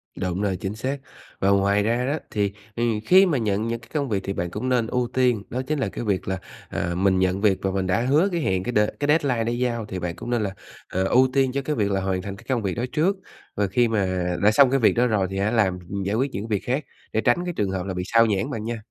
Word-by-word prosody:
Đúng 90 +1 -2
rồi, 100 -3 0
chính 95 +3 -4
xác. 130 +5 -2 0.4
Và 95 - +2
ngoài 100 +1 +3
ra 120 +3 +1
đó 145 +4 0
thì, 100 -2 0 0.2
ừm, 115 -2 0
khi 190 +2 +7
mà 160 -7 +1
nhận 110 -1 0
những 115 0 -2
cái 110 0 -18
công 145 -4 -1
việc 100 - +1
thì 100 - -3
bạn 85 -1 -3
cũng 130 - -3
nên 120 -3 +2
ưu 125 0 0
tiên, 125 -5 +2
đó 130 +2 -2
chính 155 -1 -1
là - - 0
cái - - -5
việc 100 -4 -1
là, 95 0 -1 0.3
à, 85 0 -2
mình 95 0 +2
nhận 95 +1 +1
việc 100 -3 +3
và 95 - 0
mình 95 -1 -1
đã 95 +5 +1
hứa 145 +10 +3
cái 170 -2 -1
hẹn, 95 -8 0
cái 125 - -2
đ 105 - +2 0.2
cái 145 - 0
deadline 140 -6 +2
đã 115 - -1
giao, 120 -2 -1
thì 95 -2 -5
bạn 85 -1 -3
cũng 120 - -7
nên 120 -2 +1
là, 100 - -2 0.4
ờ, 95 - 0
ưu 125 +7 +4
tiên 135 -2 +2
cho 140 +1 -1
cái 150 +3 -2
việc 100 -3 0
là 95 0 0
hoàn 95 -1 -1
thành 100 0 -6
cái - - -16
công 125 -3 +1
việc 95 -3 -1
đó 120 - -1
trước. 170 +6 +2 0.4
Và 100 -1 +1
khi 120 +5 +2
mà 95 -5 0 0.2
đã 105 - +6
xong 135 +4 +6
cái 135 +1 +2
việc 115 - +4
đó 125 +1 +3
rồi 105 -5 +1
thì 95 - -4
hả 100 +2 +1
làm, 100 -6 +2
ừm, 100 0 -3
giải 100 +2 -1
quyết 130 +4 0
những 105 +4 -4
việc 105 -2 -1
khác, 135 +4 0 0.3
để 110 - +2
tránh 175 +9 +2
cái 175 - -3
trường 100 -2 0
hợp 95 -1 -3
là 95 - -3
bị 90 0 -3
xao 115 +2 +4
nhãng 100 -4 0
bạn 110 - -4
nha. 115 +1 -3
110 Hz, 295 wpm, -24 LUFS, 95-125 Hz, 0.4 s, khi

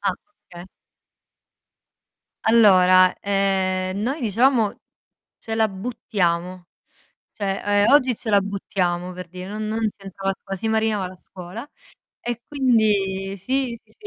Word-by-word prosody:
Ah, 200 -1 +1 0.4
okay. 175 0 -10 1.8
Allora, 185 -5 +6
ehm, 190 -1 0
noi 265 +8 -2
dicevamo 230 0 +2 0.6
"ce 225 - -6
la 220 -1 +3
buttiamo", 185 -4 -2 0.7
cioè, 195 -2 -3 0.2
ehm, - - +3
"oggi 260 -4 +4
ce 220 0 -5
la 200 -1 +5
buttiamo", 185 -3 -2
per 180 -1 -8
dì 180 +2 -9
non 215 +3 -5
non 220 +1 0
si 205 - -8
entrava 195 0 -3
a - - -3
scuo 195 0 -7
si 220 +4 -3
marinava 220 -3 +1
la 185 - -11
scuola 180 +8 -10 0.5
e 240 -1 -4
quindi, 205 -8 +1
sì, 250 +4 -2
sì, - - -27
200 Hz, 130 wpm, -22 LUFS, 185-225 Hz, 1.8 s, Allora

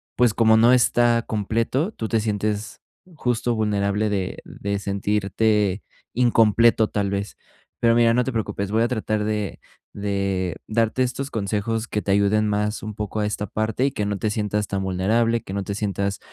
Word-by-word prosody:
pues, 120 -3 +3
como 110 0 +4
no 115 +2 +6
está 120 -1 +3
completo, 115 - -1
tú 115 - -5
te 110 0 +1
sientes 105 0 -2 0.4
justo 120 -4 0
vulnerable 105 -1 0
de 95 -3 -2
de 100 0 -4
sentirte 100 0 0 0.3
incompleto, 115 -2 +4
tal 100 -1 -1
vez. 100 -1 -3 0.5
Pero 115 -1 +4
mira, 115 -1 +4
no 125 +1 +2
te 130 - -3
preocupes, 100 -3 -3
voy 110 +1 +2
a - - +2
tratar 110 -3 -1
de 105 -3 -2 0.3
de 100 -3 -2
darte 115 +3 +1
estos 130 +2 -3
consejos 110 +2 -2
que 105 - -1
te 100 - -2
ayuden 100 +2 +2
más 105 +1 -1
un 110 0 -6
poco 105 0 -4
a 105 - +1
esta 105 0 -2
parte 110 +3 -2
y - - -1
que 105 - -2
no 100 0 -2
te 110 - -1
sientas 105 -1 -1
tan 100 0 -2
vulnerable, 110 +5 +1
que - - -10
no 100 0 -2
te 100 - -3
sientas, 100 -1 -2
105 Hz, 180 wpm, -23 LUFS, 100-115 Hz, 0.5 s, no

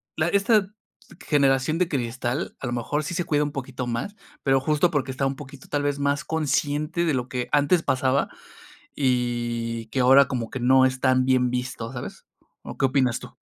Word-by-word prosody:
la 155 +1 +1
esta, 200 +1 +3 0.6
generación 140 0 +2
de 180 -1 +1
cristal, 125 +1 -3
a - - -6
lo 120 - -2
mejor 125 +5 -1
sí 175 - -4
se 175 +1 -1
cuida 150 -1 +1
un 145 - -4
poquito 130 -1 -5
más, 120 - -3 0.3
pero 135 -1 +3
justo 150 +5 +2
porque 140 -4 -1
está 130 +1 -2
un 135 - -3
poquito 140 -2 -11
tal 145 -1 -1
vez 145 0 -1
más 145 +3 0
consciente 155 +2 -1
de 160 - +1
lo 125 -1 -2
que 125 +1 -3
antes 150 +4 +3
pasaba 130 0 +1 0.7
y 120 -3 -1
que 130 - -3
ahora 135 +2 +6
como 120 -4 -3
que 130 - -4
no 130 +1 +5
están 130 0 +2
bien 130 -1 +3
vistos, 125 -1 -4
¿sabes? 120 - -8 0.4
¿O - - -8
qué - - +2
opinas 130 -2 +1
tú? - - -12
135 Hz, 190 wpm, -24 LUFS, 125-145 Hz, 0.7 s, ahora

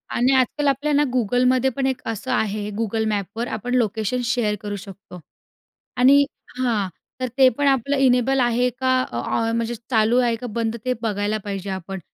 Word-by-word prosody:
आणि 255 +3 +3
आजकाल 280 +3 +1
आपल्या 285 +2 +1
ना 290 +1 +4
Googleमध्ये 250 +3 +2
पण 265 +2 -3
एक 260 -2 -2
असं 225 +3 -4
आहे, 210 -3 -1
Google 220 0 -1
Mapsवर 210 +4 -3
आपण 245 +4 -4
लोकेशन 225 +1 0
शेअर 235 -4 0
करू 205 -1 -4
शकतो. 195 -2 -11 0.8
आणि 275 +3 +6 0.3
हां, 230 -6 0 0.3
तर 255 - 0
ते 265 -1 +7
पण 285 -1 +2
आपलं 275 +1 +2
इनेबल 265 0 +3
आहे 245 0 +2
का, 260 0 +1 0.2
ऑ 120 0 -3 0.3
म्हणजे 230 +1 -1
चालू 225 0 +3
आहे 240 -2 +2
का 245 +2 -7
बंद 225 0 -1
ते 255 - +1
बघायला 210 -1 -1
पाहिजे 195 -1 -4
आपण. 190 0 -5
240 Hz, 175 wpm, -22 LUFS, 210-255 Hz, 0.8 s, ते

